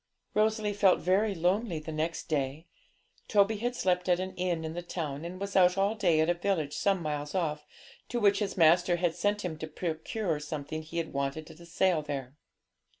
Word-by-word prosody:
Rosalie 215 Hz, 0 st, +1 dB
felt 195 Hz, -2 st, +4 dB
very 195 Hz, +3 st, +2 dB
lonely 180 Hz, +2 st, 0 dB
the 155 Hz, +1 st, -6 dB
next 160 Hz, +2 st, -2 dB
day. 145 Hz, +1 st, -2 dB, 0.6 s
Toby 210 Hz, +1 st, +3 dB
had 245 Hz, +3 st, -2 dB
slept 180 Hz, -4 st, 0 dB
at 175 Hz, 0 st, +4 dB
an 185 Hz, 0 st, -4 dB
inn 175 Hz, -3 st, -1 dB
in 160 Hz, -, -4 dB
the 175 Hz, -, -4 dB
town, 160 Hz, -4 st, -4 dB
and 180 Hz, +2 st, -6 dB
was 200 Hz, 0 st, -5 dB
out 180 Hz, -1 st, +5 dB
all 200 Hz, +2 st, +2 dB
day 180 Hz, -8 st, +2 dB
at 160 Hz, -, +2 dB
a 175 Hz, -, +3 dB
village 175 Hz, -5 st, -1 dB
some 195 Hz, -3 st, +1 dB
miles 150 Hz, +1 st, -3 dB
off, 150 Hz, -4 st, -1 dB, 0.4 s
to 240 Hz, -, -1 dB
which 205 Hz, -2 st, +4 dB
his 200 Hz, -3 st, -2 dB
master 175 Hz, +1 st, +5 dB
had 175 Hz, -1 st, 0 dB
sent 205 Hz, +1 st, 0 dB
him 160 Hz, -3 st, -4 dB
to 160 Hz, -, -4 dB
procure 160 Hz, +2 st, -3 dB
something 150 Hz, +1 st, -5 dB
he 165 Hz, +2 st, -3 dB
wanted 140 Hz, +1 st, -4 dB
at 160 Hz, -, -15 dB
a 170 Hz, -, -13 dB
sale 175 Hz, -1 st, +2 dB
there. 140 Hz, -3 st, -5 dB
175 Hz, 200 wpm, -30 LUFS, 155-195 Hz, 0.6 s, out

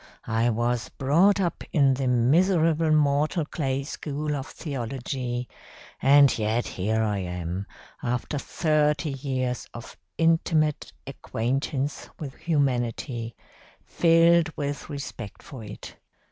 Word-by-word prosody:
I 115 Hz, +2 st, +1 dB
was 120 Hz, 0 st, -1 dB
brought 170 Hz, +9 st, +3 dB
up 175 Hz, -3 st, -1 dB
in 140 Hz, -3 st, +4 dB
the 130 Hz, 0 st, -1 dB
miserable 160 Hz, +6 st, +3 dB
mortal 150 Hz, +1 st, +2 dB
clay 140 Hz, -3 st, -2 dB
school 150 Hz, +1 st, -4 dB
of 135 Hz, -1 st, -5 dB
theology, 125 Hz, -2 st, -4 dB, 0.5 s
and 140 Hz, -2 st, +6 dB
yet 110 Hz, +3 st, 0 dB
here 110 Hz, +4 st, 0 dB
I 105 Hz, -2 st, 0 dB
am, 90 Hz, +1 st, -4 dB, 0.3 s
after 125 Hz, +4 st, -2 dB
thirty 150 Hz, 0 st, +1 dB
years 130 Hz, -2 st, -3 dB
of 120 Hz, -, -9 dB, 0.2 s
intimate 165 Hz, -2 st, +2 dB
acquaintance 135 Hz, +4 st, -3 dB
with 140 Hz, -4 st, -6 dB
humanity, 125 Hz, -6 st, -1 dB, 0.5 s
filled 165 Hz, 0 st, +4 dB
with 145 Hz, 0 st, -4 dB
respect 140 Hz, -7 st, -7 dB
for 130 Hz, -5 st, -9 dB
it. 105 Hz, -1 st, -9 dB
135 Hz, 110 wpm, -26 LUFS, 120-155 Hz, 0.5 s, and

